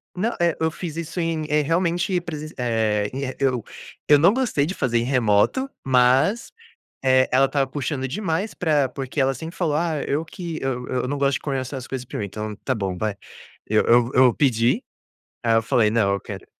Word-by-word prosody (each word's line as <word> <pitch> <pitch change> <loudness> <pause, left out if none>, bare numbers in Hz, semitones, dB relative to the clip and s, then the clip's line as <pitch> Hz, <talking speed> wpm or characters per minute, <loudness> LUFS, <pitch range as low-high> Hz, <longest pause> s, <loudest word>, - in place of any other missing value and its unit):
Não, 215 +6 -1
eh, 170 -2 +2
eu 160 0 +1
fiz 165 -1 -6
isso 170 +2 -5
em 165 -2 -1
eh, 150 0 +3
realmente, 175 +4 0
presenc 155 -2 -7
eh, 110 -4 0
e 135 0 -4
eu 130 -4 +1 0.4
eu 145 - +7
não 170 +7 +5
gostei 240 - +1
de 175 - -3
fazer 120 -9 0
em 115 - +1
remoto, 125 - +2 0.2
mas, 130 - +3 0.5
eh, 130 0 +4
ela 135 +2 +5
estava 140 0 0
puxando 135 0 -3
demais 185 - -2
pra 150 -5 +1
porque 135 +2 -7
ela 135 0 +3
sempre 160 +6 -8
falou: 165 -5 0
"Ah, 160 -2 -1
eu 150 +3 -1
que 165 0 -6
eu 125 -2 -2
eu 125 0 -2
não 145 - -2
gosto 140 0 +1
de - - -2
conversar 135 -1 -3
as 130 - -8
coisas 130 -2 -5
pra - - -7
mim", 105 - -2
então 105 +2 -5
tá 130 - 0
bom 95 -5 -3
vai. 105 0 -2 0.5
Eu 110 0 +3
eu 120 0 +4
eu 125 -2 +5
pedi, 120 -4 +2 0.6
aí 115 -1 +3
eu 115 - +4
falei: 115 -1 +2
"Não, 105 -3 +2
eu 100 - -1
quero", - - -8
135 Hz, 205 wpm, -23 LUFS, 120-160 Hz, 0.6 s, eu